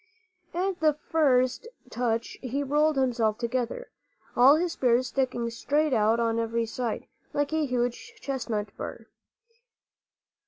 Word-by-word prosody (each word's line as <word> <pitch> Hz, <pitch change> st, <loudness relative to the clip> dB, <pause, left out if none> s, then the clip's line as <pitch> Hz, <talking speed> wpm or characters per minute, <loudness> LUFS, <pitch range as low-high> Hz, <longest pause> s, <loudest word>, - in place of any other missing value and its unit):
At 370 Hz, +1 st, -1 dB
the 310 Hz, -1 st, +4 dB, 0.2 s
first 255 Hz, -, +2 dB, 0.2 s
touch 230 Hz, -2 st, -2 dB
he 270 Hz, +3 st, -2 dB
rolled 300 Hz, +2 st, +2 dB
himself 235 Hz, -5 st, +1 dB
together, 250 Hz, -, -3 dB, 0.4 s
all 260 Hz, +4 st, +7 dB
his 345 Hz, +2 st, 0 dB
spears 250 Hz, -3 st, +2 dB
sticking 240 Hz, -2 st, -1 dB
straight 290 Hz, +5 st, 0 dB
out 220 Hz, 0 st, +3 dB
on 230 Hz, 0 st, +1 dB
every 230 Hz, 0 st, 0 dB
side, 230 Hz, 0 st, -3 dB, 0.3 s
like 290 Hz, +1 st, 0 dB
a 315 Hz, -2 st, +1 dB
huge 245 Hz, -, -2 dB
chestnut 225 Hz, -, -3 dB
bur. -, -, -7 dB
255 Hz, 125 wpm, -27 LUFS, 230-295 Hz, 0.4 s, all